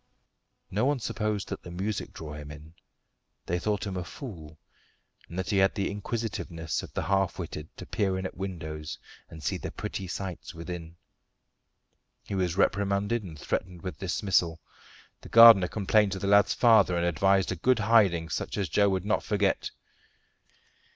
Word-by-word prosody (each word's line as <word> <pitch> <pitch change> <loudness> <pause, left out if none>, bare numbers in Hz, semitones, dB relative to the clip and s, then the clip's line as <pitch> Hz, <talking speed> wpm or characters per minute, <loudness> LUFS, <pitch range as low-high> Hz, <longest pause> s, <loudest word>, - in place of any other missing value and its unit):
No 105 +4 0
one 145 -1 +1
supposed 105 -2 -2
that 100 - -5
the - - -10
music 100 +4 -3
drew 75 -2 -8
him. 75 +1 -10 0.7
They 90 +1 -1
thought 105 +2 -1
him 100 -2 -4
a 90 - -2
fool, 85 - -9 0.7
and 85 - -8
that 95 +3 -2
he 100 - +2
had 95 0 +3
the 100 - -1
inquisitiveness 100 -6 -3
of - - -10
the - - -1
half 95 -3 +1
witted 80 -3 -6
to - - -8
peer 95 -2 0
in 95 - -4
at - - -5
windows 80 -5 -5 0.3
and 80 -2 -11
see - - -1
the - - -5
pretty 95 - -5
sights 90 -2 -6
within. 85 0 -7 1.3
He - - -7
was 90 -2 -1
reprimanded, 100 +3 +1
and 85 -6 -9
threatened 90 +3 -4
with 95 - -6
dismissal. 90 -3 0 0.6
The - - -12
gardener 115 -5 +9
complained 105 +1 +2
to - - -3
the 95 - -4
lad's 100 +1 +4
father 110 -7 +5
and 85 - +1
advised 95 +3 +2
a - - -1
good 125 +9 +2
hiding, 100 -7 +3
such - - -3
as 100 -5 -1
Joe 100 +4 +3
should 95 0 -3
not 105 - +1
forget. 105 -3 0
95 Hz, 170 wpm, -28 LUFS, 85-100 Hz, 1.3 s, gardener